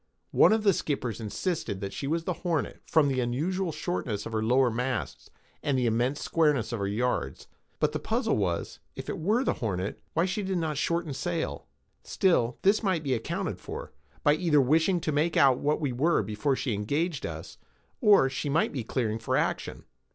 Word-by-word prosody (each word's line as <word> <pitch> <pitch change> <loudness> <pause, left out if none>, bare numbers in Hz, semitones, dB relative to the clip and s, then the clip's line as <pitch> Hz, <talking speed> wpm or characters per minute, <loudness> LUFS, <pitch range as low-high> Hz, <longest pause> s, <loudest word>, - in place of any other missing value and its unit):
One - - +6
of 220 -1 +2
the 200 -2 +5
skippers 125 - -2
insisted 110 - -3
that 100 -1 -4
she 135 - -4
was 165 +3 0
the 180 - -1
Hornet, 170 -5 -2
from 155 -3 +4
the 135 -2 0
unusual 165 +10 -1
shortness 150 - -3
of - - -6
her 110 -1 -1
lower 125 +2 +3
masts, 125 0 -3 0.3
and 140 -2 0
the 125 - +1
immense 120 +5 0
squareness 150 -9 +2
of 115 - -3
her 100 - -1
yards. 120 +5 -1 0.3
But - - +2
the - - -3
puzzle - - 0
was, 90 -5 -2 0.2
if - - -7
it - - -3
were 215 +10 +2
the - - +1
Hornet, 100 -3 -2
why 165 +2 +2
she 200 +3 -2
did 190 -2 -1
not 160 -3 -1
shorten 170 -1 -1
sail. 170 +4 -3 0.3
Still 130 - +1
this 200 +3 +4
might 185 -7 0
be 135 -3 0
accounted 115 -2 -3
for, - - -7 0.3
by 145 - +5
her 155 - -3
either 160 -5 +4
wishing 160 +7 +3
to 155 - -1
make 155 +3 +1
out 130 -2 +5
what 150 +1 +1
we 145 -4 -1
were 140 +1 +2
before 110 +7 0
she 130 -3 -2
engaged 145 - -1
us, - - -7 0.4
or 205 - +6
she 140 +2 -3
might 155 +4 +2
be 130 - -3
clearing 110 -1 -1
for 115 - 0
action. - - -2
145 Hz, 200 wpm, -28 LUFS, 120-170 Hz, 0.4 s, One